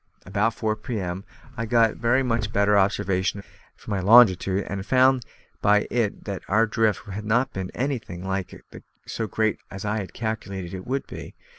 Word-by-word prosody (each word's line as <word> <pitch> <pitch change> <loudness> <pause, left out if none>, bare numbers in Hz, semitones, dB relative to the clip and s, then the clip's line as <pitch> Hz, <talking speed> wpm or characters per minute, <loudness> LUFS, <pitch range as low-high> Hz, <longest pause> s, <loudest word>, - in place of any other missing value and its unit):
About 105 +4 0
four 110 -1 -1
p.m. 100 -4 -4 0.3
I 115 +1 -3
got 115 -1 +4
a - - -10
very 120 +3 +1
much 115 -4 -1
better 100 0 +3
observation 100 -1 +1 0.3
for - - -10
my 100 - 0
longitude, 100 -2 +5
and 100 - -4
I - - -4
found 130 +4 +3 0.4
by 105 0 +4
it 115 -4 -1
that 100 -3 -4
our 110 +3 +3
drift 110 -2 0
had 105 +2 -5
not 115 +5 +1
been 95 -1 -4
anything 115 -9 -3
like 95 -1 -4 0.4
so 110 - -3
great 110 +2 0
as 95 +1 -7
I 105 +1 0
had 100 -3 -6
calculated 100 -5 -4
it 95 -1 -7
would 135 +2 -2
be. - - -9
105 Hz, 180 wpm, -24 LUFS, 95-115 Hz, 0.4 s, longitude